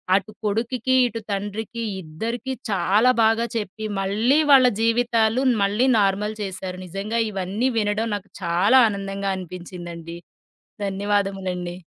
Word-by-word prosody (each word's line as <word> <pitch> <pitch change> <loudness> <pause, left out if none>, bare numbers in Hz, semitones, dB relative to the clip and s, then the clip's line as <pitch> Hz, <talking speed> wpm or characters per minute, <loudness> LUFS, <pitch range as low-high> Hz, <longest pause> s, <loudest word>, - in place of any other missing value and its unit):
అటు 195 +2 -1
కొడుకికి, 235 +4 0
ఇటు 230 -1 -5
తండ్రికి 205 +4 -4 0.2
ఇద్దరికి 225 +11 -4 0.2
చాలా 205 +6 +3
బాగా 225 +1 +3
చెప్పి 215 0 -5
మళ్ళీ 220 +9 +2
వాళ్ళ 265 -2 +8
జీవితాలు 230 +1 +2 0.2
మళ్ళీ 210 +6 +2
నార్మల్ 205 +2 +1
చేశారు. 185 -2 -5
నిజంగా 200 +6 -3
ఇవన్నీ 200 +5 -1
వినడం 210 +2 0
నాకు 200 0 -15
చాలా 180 +9 +4
ఆనందంగా 195 -1 -3
అనిపించిందండి. 175 -2 -8 0.7
ధన్యవాదములండి. 195 -3 -2
205 Hz, 110 wpm, -23 LUFS, 190-225 Hz, 0.7 s, వాళ్ళ